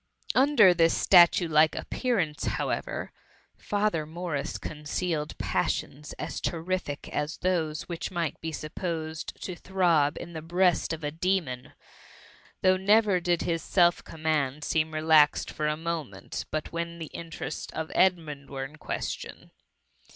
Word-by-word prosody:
Under 255 Hz, -8 st, +6 dB
this 165 Hz, -1 st, +3 dB
statue^like 165 Hz, -3 st, +6 dB
appearance, 185 Hz, -, -1 dB
however, -, -, -2 dB, 0.4 s
Father 205 Hz, -7 st, -1 dB
Morris 160 Hz, -3 st, -3 dB
concealed 150 Hz, +1 st, -3 dB
passions 150 Hz, +2 st, -2 dB
as -, -, -5 dB
terrific 165 Hz, -3 st, -3 dB
as 150 Hz, +2 st, -2 dB
those 165 Hz, -4 st, -1 dB
which 170 Hz, -2 st, -5 dB
might 170 Hz, -4 st, -3 dB
be 160 Hz, -, -3 dB
supposed 160 Hz, 0 st, -5 dB
to 185 Hz, -, -4 dB
throb 170 Hz, -5 st, +2 dB
in 170 Hz, 0 st, -8 dB
the 160 Hz, -, -5 dB
breast 175 Hz, +1 st, +2 dB
of 160 Hz, -1 st, -4 dB
a 145 Hz, -, -1 dB
demon: 165 Hz, -7 st, -1 dB, 0.9 s
though 185 Hz, 0 st, +5 dB
never 205 Hz, 0 st, +4 dB
did 175 Hz, -1 st, 0 dB
his 165 Hz, -2 st, -1 dB
self 175 Hz, +1 st, +3 dB
command 155 Hz, -3 st, -1 dB
seem 160 Hz, 0 st, 0 dB
relaxed 155 Hz, -1 st, +4 dB
for 150 Hz, -, -2 dB
a 150 Hz, 0 st, 0 dB
moment, 160 Hz, -, -4 dB
but 155 Hz, 0 st, -3 dB
when 170 Hz, 0 st, -4 dB
the 160 Hz, -2 st, -7 dB
interests 165 Hz, -1 st, -6 dB
of 160 Hz, 0 st, -4 dB
Edmund 160 Hz, -7 st, +1 dB
were 135 Hz, -1 st, -4 dB
in 150 Hz, +3 st, -12 dB
ques -, -, -3 dB
tion. -, -, -9 dB
165 Hz, 135 wpm, -28 LUFS, 150-180 Hz, 0.9 s, Under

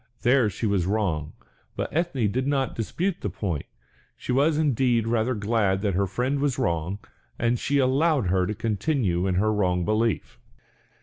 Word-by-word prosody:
There 125 Hz, -2 st, +4 dB
she 110 Hz, -, -4 dB
was 100 Hz, -4 st, +1 dB
wrong; 90 Hz, -8 st, -1 dB, 0.4 s
but -, -, -4 dB
Ethne 160 Hz, -8 st, 0 dB
did 130 Hz, +6 st, -1 dB
not 135 Hz, -3 st, 0 dB
dispute 170 Hz, -, -2 dB
the 105 Hz, -, -2 dB
point, 90 Hz, -5 st, -4 dB, 0.5 s
she -, -, -5 dB
was 145 Hz, +4 st, +3 dB
indeed 130 Hz, -6 st, +2 dB
rather 115 Hz, +2 st, +1 dB
glad 100 Hz, -2 st, 0 dB
that 100 Hz, -2 st, +1 dB
her 100 Hz, +2 st, +1 dB
friend 130 Hz, +8 st, -1 dB
was 140 Hz, -3 st, 0 dB
wrong, 85 Hz, +3 st, -1 dB, 0.4 s
and 120 Hz, 0 st, +1 dB
she 145 Hz, -, 0 dB
allowed 140 Hz, 0 st, +2 dB
her 90 Hz, 0 st, +1 dB
to 105 Hz, -, -3 dB
continue 105 Hz, -, 0 dB
in 95 Hz, -, 0 dB
her 110 Hz, +3 st, +2 dB
wrong 90 Hz, -4 st, +1 dB
belief. 110 Hz, -, -1 dB
110 Hz, 170 wpm, -25 LUFS, 95-130 Hz, 0.5 s, There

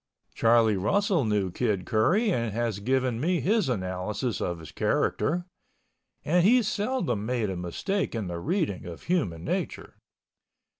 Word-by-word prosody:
Charlie 115 Hz, -2 st, +4 dB
Russell 185 Hz, -, +1 dB
knew 105 Hz, -4 st, 0 dB
Kid 105 Hz, -4 st, -1 dB
Curry 190 Hz, -, +2 dB
and 115 Hz, -8 st, 0 dB
has 115 Hz, -3 st, -1 dB
given 130 Hz, +1 st, 0 dB
me 175 Hz, +3 st, +1 dB
his 205 Hz, -5 st, +1 dB
analysis 95 Hz, +2 st, -2 dB
of 85 Hz, -1 st, -2 dB
his 80 Hz, -2 st, -11 dB
character 175 Hz, +4 st, 0 dB, 0.8 s
(and 175 Hz, +3 st, +3 dB
he 240 Hz, +5 st, +5 dB
seldom 205 Hz, -, -1 dB
made 115 Hz, -3 st, -1 dB
a -, -, -3 dB
mistake 120 Hz, -, -2 dB
in 110 Hz, -3 st, -2 dB
the 85 Hz, -1 st, -4 dB
reading 160 Hz, -, -1 dB
of 85 Hz, -2 st, -9 dB
human 100 Hz, -, -1 dB
nature). -, -, -3 dB
120 Hz, 145 wpm, -27 LUFS, -, 0.8 s, he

